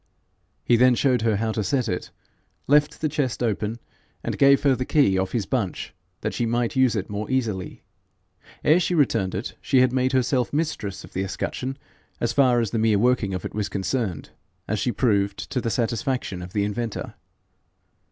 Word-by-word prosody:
He 120 - +4
then 125 +1 +5
showed 125 -1 +2
her 110 -1 +2
how 110 +2 -1
to 110 -1 -2
set 125 +2 0
it, 90 -4 -3 0.6
left 150 +1 +3
the 155 - +2
chest 135 -4 -1
open, 110 0 -1 0.5
and - - -2
gave 140 0 +5
her 140 -2 +4
the 130 - -2
key 130 -8 +3
off 95 0 -1
his 110 -5 0
bunch 110 -9 -3 0.3
that - - -2
she 120 - -1
might 120 +1 0
use 130 -3 +3
it 100 -3 -2
more 105 +1 -4
easily. 115 -8 -2 0.8
Ere 160 +4 +5
she 180 0 0
returned 115 - +1
it, 100 +6 -4
she 130 -2 +3
had 130 -1 +3
made 130 0 +1
herself 125 -1 +1
mistress 145 - -2
of - - -14
the 95 - -1
escutcheon 130 +7 -4 0.4
as 115 -1 0
far 125 -3 +4
as 115 -3 -1
the 115 - 0
mere 110 -2 +3
working 110 -4 +2
of 90 - -5
it - - -5
was 105 -1 -2
concerned, 100 - -2 0.4
as 110 0 -1
she 125 - 0
proved 100 -5 +1
to 125 - -1
the 115 - -1
satisfaction 115 -4 -1
of 90 0 -8
the 105 - +1
inventor. 105 +2 -3
120 Hz, 190 wpm, -24 LUFS, 105-130 Hz, 0.8 s, then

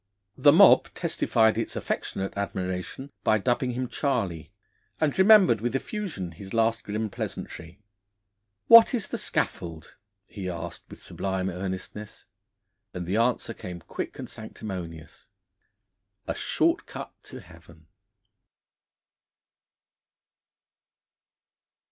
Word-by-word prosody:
The 145 - +6
mob 190 +6 +7
testified 115 -9 +2
its - - -3
affectionate 95 0 -3
admiration 95 +6 -4
by 110 - +4
dubbing 120 +3 0
him 125 +1 -2
'Charley,' 115 - -2 0.5
and 155 -3 +1
remembered 190 - +6
with 120 +2 -1
effusion 145 - -4
his 95 +5 -9
last 115 0 +2
grim 110 +1 -2
pleasantry. 85 +4 -7 0.9
'What 230 +2 +8
is 225 - -1
the - - -3
scaffold?' 85 -3 -3 0.3
he 95 -3 -6
asked 85 -2 -6
with - - -11
sublime 95 -1 -2
earnestness. 95 +3 -6 0.7
And 90 -1 -4
the 95 +5 -1
answer 115 0 +1
came 90 -4 -8
quick - - -6
and - - -6
sanctimonious: 85 -6 -8 1.0
'A - - 0
short - - +1
cut - - -8
to - - -9
Heaven!' 80 -1 -17
105 Hz, 105 wpm, -26 LUFS, 90-125 Hz, 1.0 s, What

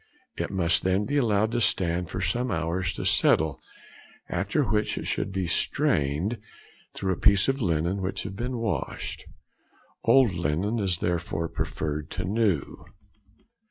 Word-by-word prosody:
It - - -2
must 90 -3 +2
then 95 +2 +1
be 145 +4 0
allowed 110 -4 +2
to 120 - 0
stand 90 -4 +1
for - - -4
some 125 +1 0
hours 85 -1 -1
to - - -4
settle, 80 -2 +3 0.7
after - - 0
which 105 +1 0
it - - -4
should - - -2
be 95 -1 -1
strained 80 +5 0 0.6
through 95 -1 0
a - - -5
piece 100 -3 +5
of 135 0 0
linen 85 +1 0
which 95 +1 -2
has 95 - -6
been 120 +5 -3
washed; 105 - -3 0.8
old 130 -7 +5
linen 85 +7 -1
is 95 -4 +1
therefore 85 -1 -1
preferred 75 -1 -3
to 90 - -3
new. 100 -6 0
95 Hz, 150 wpm, -27 LUFS, 85-105 Hz, 0.8 s, piece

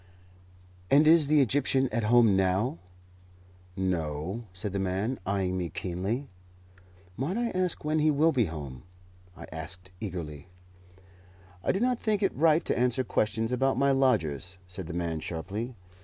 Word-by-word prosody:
"And 145 +3 +6
is 160 -1 +6
the 150 0 +5
Egyptian 135 0 +2
at 115 -3 -1
home 115 -2 +5
now?" 95 +2 +1 1.0
"No," 90 +3 -2
said 95 +2 -5
the 100 - -1
man, 95 +7 -1
eyeing 95 -2 0
me 85 -2 -2
keenly. 95 - -3 0.9
"Might 145 - -2
I 235 -1 0
ask 185 -4 -1
when 155 +1 +1
he 155 +1 +3
will 155 +3 +4
be 125 -7 +2
home?" 70 -7 -7 0.6
I - - -8
asked 90 +4 -7
eagerly. 85 -7 -6 1.2
"I - - +2
do 190 - -1
not 250 +1 +1
think 210 -2 0
it 195 - +1
right 160 +2 +3
to - - 0
answer 125 +1 +1
questions 115 0 0
about 135 +1 +1
my 140 +1 +3
lodgers," 90 - +1
said 90 -1 -4
the 85 - -6
man, 85 -2 -2
sharply. 100 +10 -5
110 Hz, 155 wpm, -28 LUFS, 90-140 Hz, 1.2 s, And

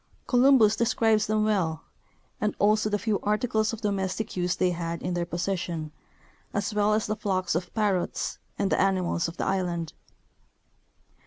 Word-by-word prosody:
Columbus 245 -4 +5
describes 225 -2 +2
them 215 0 +1
well, 170 -7 0 0.6
and 210 -1 0
also 215 +1 +3
the 205 - +1
few 210 -1 -1
articles 215 +1 +1
of 230 -1 -7
domestic 200 +1 -2
use 180 -1 0
they 180 - +1
had 170 -1 -3
in 180 - -2
their 175 -1 -1
possession, 170 -3 -3 0.6
as 205 +2 -1
well 210 0 +3
as 215 - 0
the 215 - -1
flocks 185 -3 -1
of 175 +2 -2
parrots 205 -5 -1 0.2
9.nd 195 - 0
the - - +3
animals 185 -3 +1
of 165 +1 -8
the - - -2
island. 175 -4 -1
200 Hz, 160 wpm, -27 LUFS, 175-215 Hz, 0.6 s, Columbus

